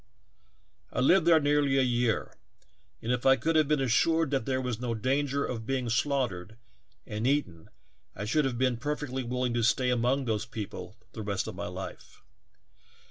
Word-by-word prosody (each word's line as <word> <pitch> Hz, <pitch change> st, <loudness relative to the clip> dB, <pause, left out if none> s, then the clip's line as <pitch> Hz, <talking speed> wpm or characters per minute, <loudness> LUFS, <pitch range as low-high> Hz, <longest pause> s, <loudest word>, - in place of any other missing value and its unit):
"I -, -, -3 dB
lived 165 Hz, +6 st, +4 dB
there 165 Hz, -2 st, +7 dB
nearly 145 Hz, -2 st, +2 dB
a 135 Hz, -, +4 dB
year, 120 Hz, -2 st, 0 dB, 0.7 s
and 115 Hz, -, -1 dB
if 125 Hz, -1 st, 0 dB
I 135 Hz, 0 st, +6 dB
could 160 Hz, +6 st, -1 dB
have 155 Hz, -2 st, +4 dB
been 150 Hz, 0 st, +2 dB
assured 145 Hz, +5 st, +2 dB
that 135 Hz, -5 st, -1 dB
there 130 Hz, -1 st, 0 dB
was 125 Hz, -3 st, -3 dB
no 120 Hz, -2 st, -2 dB
danger 140 Hz, +4 st, 0 dB
of 115 Hz, -3 st, -5 dB
being 130 Hz, -3 st, -1 dB
slaughtered 110 Hz, -6 st, -1 dB, 0.5 s
and 110 Hz, +1 st, -2 dB
eaten 110 Hz, -, -1 dB, 0.5 s
I 100 Hz, -, -4 dB
should 145 Hz, +7 st, +2 dB
have 130 Hz, -3 st, -1 dB
been 125 Hz, -1 st, +1 dB
perfectly 145 Hz, 0 st, -3 dB
willing 125 Hz, 0 st, -2 dB
to 120 Hz, -, 0 dB
stay 125 Hz, +2 st, +2 dB
among 125 Hz, +3 st, +1 dB
those 110 Hz, -2 st, -1 dB
people 105 Hz, -1 st, -7 dB, 0.2 s
the 110 Hz, -, -7 dB
rest 100 Hz, -2 st, -2 dB
of -, -, -5 dB
my -, -, -5 dB
life. -, -, -8 dB
125 Hz, 180 wpm, -29 LUFS, 115-140 Hz, 0.7 s, there